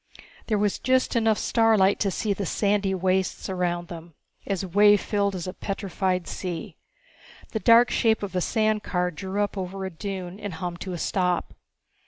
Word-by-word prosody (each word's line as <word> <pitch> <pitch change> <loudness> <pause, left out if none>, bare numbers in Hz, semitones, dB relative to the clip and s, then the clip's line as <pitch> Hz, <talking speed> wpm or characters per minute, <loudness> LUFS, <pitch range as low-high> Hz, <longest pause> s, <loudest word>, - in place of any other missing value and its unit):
There 215 - +1
was 205 -1 0
just 260 0 +1
enough 225 -2 +3
starlight 220 -4 +3
to 200 - +1
see 205 +2 -1
the 195 -1 -4
sandy 200 +1 +1
wastes 185 +1 0
around 175 -2 -1
them, 165 -2 -10 0.3
as 195 -1 -1
wave 205 +3 +5
filled 200 -1 0
as 175 - -4
a 185 - -5
petrified 190 -3 -2
sea. 175 -3 -5 0.8
The 220 - -2
dark 235 +2 +6
shape 220 -2 +2
of 190 -2 -5
a 180 - +1
sand 215 +2 +1
car 180 -2 -1
drew 190 +5 -2
up 205 -1 -3
over 190 +1 -4
a 190 - -4
dune 185 +1 -6
and 205 -5 -5
hummed 175 0 -5
to 185 - -4
a - - -3
stop. 180 0 -1
195 Hz, 180 wpm, -25 LUFS, 180-210 Hz, 0.8 s, dark